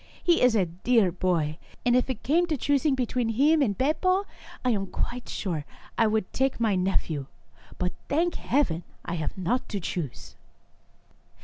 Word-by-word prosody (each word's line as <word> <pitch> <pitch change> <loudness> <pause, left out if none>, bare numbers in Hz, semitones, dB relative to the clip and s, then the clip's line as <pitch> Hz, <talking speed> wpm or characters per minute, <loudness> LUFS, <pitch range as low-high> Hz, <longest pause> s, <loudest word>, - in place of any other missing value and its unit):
He 345 -1 +4
is 250 -2 +5
a 195 -4 +3
dear 190 +4 +2
boy, 170 -3 0 0.3
and 245 0 +4
if 255 +1 +2
it 240 -4 -4
came 340 +6 +3
to 310 -3 0
choosing 285 +2 +2
between 250 -2 0
him 290 +7 +4
and 205 -8 +1
Beppo, 370 +8 +2 0.4
I 250 - +4
am 195 -3 0
quite 240 +5 -4
sure 175 -6 -2
that - - -22
I 225 - +4
would 215 -3 -1
take 265 -1 0
my 225 -3 +2
nephew, 175 -6 0 0.5
but, 180 0 -1 0.2
thank 335 +4 +2
Heaven, 215 - 0 0.2
I 170 - -3
have 160 +1 -3
not 190 +8 -1
to 205 - -2
choose 165 -6 -5
230 Hz, 175 wpm, -27 LUFS, 180-270 Hz, 0.5 s, is